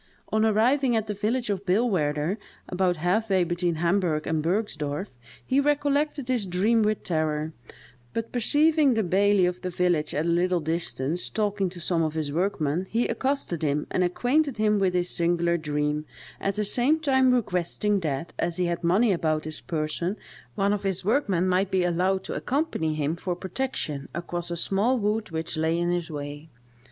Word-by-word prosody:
On 220 0 +2
arriving 240 +4 +3
at 220 -1 +1
the 210 - -3
village 220 +3 -1
of 195 -1 -3
Billwaerder, 180 -5 +1 0.3
about 180 -1 0
half 190 +7 0
way 190 -2 +3
between 175 0 -1
Hamburgh 170 -2 +1
and 160 -1 0
Bergsdorff, 165 -2 -2 0.4
he 265 +1 +2
recollected 290 -1 +1
his 245 -6 0
dream 205 +6 +2
with 215 0 0
terror; 155 -2 -1 0.6
but 230 0 -4
perceiving 295 +3 +3
the 220 - +1
baillie 195 +1 +3
of 180 0 -2
the 185 - -3
village 175 -4 0
at 155 +2 0
a - - 0
little 175 +1 +2
distance, 160 -1 -2
talking 205 -3 0
to 175 0 -9
some 170 0 0
of 160 -1 -1
his 155 -2 -2
workmen, 175 -1 0
he 235 +2 +1
accosted 265 - -2
him, 150 -1 0
and 185 - +1
acquainted 255 - +1
him 210 -1 +2
with 185 -2 +1
his 180 0 +1
singular 170 0 +1
dream, 150 -1 -1 0.3
at 195 0 -1
the 210 0 0
same 255 +9 +3
time 265 -4 +3
requesting 205 -2 0
that, 155 -2 -3
as 170 0 -1
he 180 - +1
had 170 0 -2
money 200 +7 +3
about 155 -4 0
his 155 0 -6
person, 165 +5 -2 0.4
one 200 0 +2
of 205 - -2
his 190 -2 -2
workmen 200 -7 +1
might 185 +1 +2
be 190 -2 +1
allowed 185 +2 +1
to - - -5
accompany 250 - -1
him 155 +1 -1
for 175 +1 -3
protection 180 - -3
across 175 0 -3
a 170 - -3
small 205 +9 +2
wood 215 0 -1
which 160 0 -3
lay 160 +1 +1
in 175 0 0
his 175 -2 -2
way. 145 +1 -7
180 Hz, 180 wpm, -26 LUFS, 165-215 Hz, 0.6 s, arriving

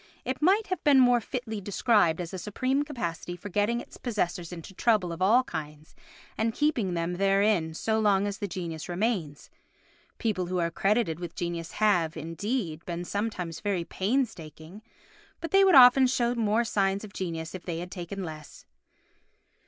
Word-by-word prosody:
It 260 +2 -3
might 390 +7 +4 0.2
be 290 - +5
more 245 -2 +5
fitly 225 -3 -5
described 200 -4 +2
as 175 0 -5
a 185 - -4
supreme 255 +8 -1
capacity 175 - -4
for 180 +4 -9
getting 210 +5 +1
its - - -11
possessors 180 -7 -2
into 175 +2 -9
trouble 205 -4 +1
of 170 +2 -7
all 225 +7 +5
kinds 155 -6 -7 0.5
and 225 0 0
keeping 240 - 0
them 170 +1 -2
therein 195 -4 +2
so 220 +5 0
long 205 -2 +3
as 200 -1 -4
the 205 - -2
genius 170 -4 -6
remains. 175 -6 -2 0.7
People 195 -6 -1
who 180 +1 -2
are 170 -1 0
credited 195 -2 +1
with 175 -2 -7
genius 170 -1 -4
have, 175 -7 +2
indeed, 165 - -3
been 175 0 -4
sometimes 185 -5 -3
very 200 -4 -1
painstaking, 190 - -3 0.6
but 330 - -6
they 390 0 +6
would 380 -2 +5
often 260 0 +8
show 245 -2 +1
more 225 -1 +1
signs 195 -3 0
of 210 -2 -10
genius 165 -3 -4
if 185 - -6
they 170 -2 -4
had 175 +2 -6
taken 190 +2 -6
less. 155 -3 -9
195 Hz, 170 wpm, -28 LUFS, 170-230 Hz, 0.7 s, often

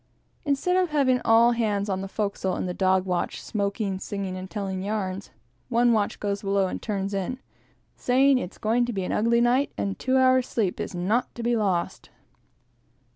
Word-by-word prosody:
Instead 290 +5 +1
of 365 -2 +2
having 265 -4 +2
all 230 +1 +5
hands 215 -4 0
on 190 -1 -2
the 195 - -4
forecastle 200 -2 -2
in - - -3
the 180 - -3
dog 190 0 +2
watch, 180 -2 -2
smoking, 200 -2 -2
singing, 195 -2 -4
and 185 0 -7
telling 195 -3 -4
yarns, 195 -1 -3 0.4
one 240 0 +3
watch 210 -2 0
goes 200 -1 -2
below 195 -1 +1
and 185 - -4
turns 200 -2 -3
in, 195 +6 -2 0.6
saying 265 +2 +3
that - - -1
it's 180 - -13
going 230 +3 +1
to 240 0 -2
be 195 -2 -2
an - - -3
ugly 235 +2 +2
night, 250 +4 +2
and 200 -1 -3
two 260 0 +1
hours' 255 -1 +4
sleep 205 -6 -1
is - - -4
not 205 +8 0
to 235 - -6
be 240 0 +2
lost. 195 -6 -1
210 Hz, 190 wpm, -25 LUFS, 195-240 Hz, 0.6 s, all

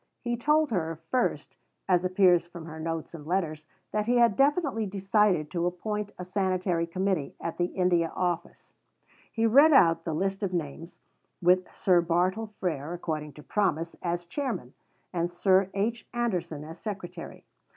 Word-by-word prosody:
He 240 -1 -1
told 300 +4 +2
her, 165 -5 -1
first, 255 - 0 0.3
as 180 -1 +3
appears 185 -2 +4
from 175 -2 -10
her 160 -1 -8
notes 165 0 -4
and 155 -3 -9
letters, 160 -4 -2 0.2
that 210 0 -1
he 245 +1 +3
had 235 -4 +5
definitely 275 - +2
decided 195 -4 +1
to 175 -1 0
appoint 210 +3 -3
a 180 - -6
Sanitary 185 -3 0
Committee 185 -4 -1
at 165 - -5
the 175 - +3
India 175 -2 +1
Office. 175 -2 -3 0.6
He 225 -1 0
read 280 +8 +7
out 165 -9 +5
the 165 -2 -2
list 195 +4 -1
of 195 -3 -2
names; 165 0 -5 0.4
with 180 +1 +3
Sir 180 -3 +4
Bartle 180 +6 0
Frere, 160 -3 -2
according 155 -4 -4
to 150 - -13
promise, 170 -4 0
as 175 0 -2
chairman, 230 - -4 0.4
and 170 -1 0
Sir 185 +2 +3
H. 225 +4 -1
Anderson 175 -10 -2
as 160 +2 -10
secretary. 180 -5 -7
180 Hz, 160 wpm, -28 LUFS, 165-210 Hz, 0.6 s, read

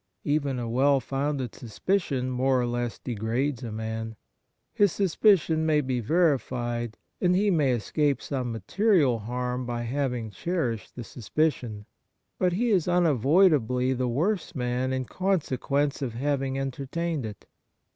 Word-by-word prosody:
Even 145 -3 0
a 120 -1 -3
well 135 +4 +3
founded 135 0 -2
suspicion 140 - -1
Kind 130 - -2
Thouo^hts - - -3
6i - - -4
more 130 0 +2
or - - 0
less 120 -1 -2
degrades 120 +4 -2
a 115 - -5
man. 110 +1 -4 0.6
His 205 -3 +4
sus 195 -5 0
picion 175 -7 +4
may 160 -1 +3
be 130 -3 -1
verified, 120 -5 0 0.2
and 180 -1 +3
he 200 +2 +3
may 145 -7 +3
escape 140 +4 0
some 130 -4 -3
material 135 - +2
harm 125 +3 -3
by 120 -1 -2
having 125 -3 -2
cherished 120 - -3
the 120 - -6
suspicion. 120 -3 -2 0.5
But 180 -1 +2
he 235 +6 +1
is 185 -5 +2
unavoidably 145 - +3
the 130 0 -1
worse 175 - -1
man 125 0 -1
in 130 -1 -1
consequence 145 -5 0
of 120 -4 -3
having 135 0 -1
enter 135 0 -4
tained 170 -1 -2
it. 110 -2 -8
130 Hz, 155 wpm, -27 LUFS, 120-155 Hz, 0.6 s, His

